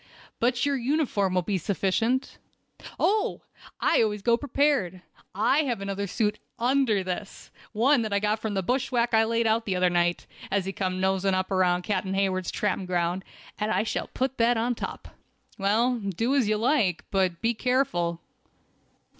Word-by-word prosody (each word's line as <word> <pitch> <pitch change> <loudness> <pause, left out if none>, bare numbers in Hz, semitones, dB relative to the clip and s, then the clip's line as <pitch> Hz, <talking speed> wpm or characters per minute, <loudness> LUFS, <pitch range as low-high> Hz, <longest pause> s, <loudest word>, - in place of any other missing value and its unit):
"But 245 +2 +1
your 285 -1 +1
uniform 240 -8 0
will 180 - +2
be 195 +1 -1
sufficient." 225 - -1 0.6
"Oh! 420 +1 +1 0.4
I - - +3
always 210 -2 -1
go 235 +1 +4
prepared. 270 -9 0 0.3
I 230 +8 +3
have 245 -6 -1
another 200 0 -3
suit 210 +2 -1 0.2
under 240 -4 +2
this, 185 +2 -6 0.2
one 240 +3 +3
as 215 - -4
I 200 - +2
got 210 +1 0
from 220 -2 -3
the 190 - 0
bushwhack 245 +1 0
I 220 0 +5
laid 230 +1 0
out 225 +1 +2
the 190 - 0
other 180 0 +2
night, 175 0 +1 0.2
as 195 -1 0
he 195 - -3
came 185 -1 -2
noseing 190 0 +1 0.2
around 180 -1 +2
Captain 195 -1 -1
Hayward's 190 -2 0
tramping 200 -2 -2
ground, 175 +1 -1 0.4
and 210 0 -1
I 215 - +2
shall 220 - -3
put 260 0 -3
that 235 +1 +3
on 240 +2 +1
top." - - -7 0.5
"Well, 230 +5 +2
do 215 +5 -1
as 260 -7 +2
you 215 - +2
like, 225 - +1
but 185 -3 +1
be 230 +5 +1
careful!" 195 -10 0
210 Hz, 170 wpm, -26 LUFS, 190-240 Hz, 0.6 s, I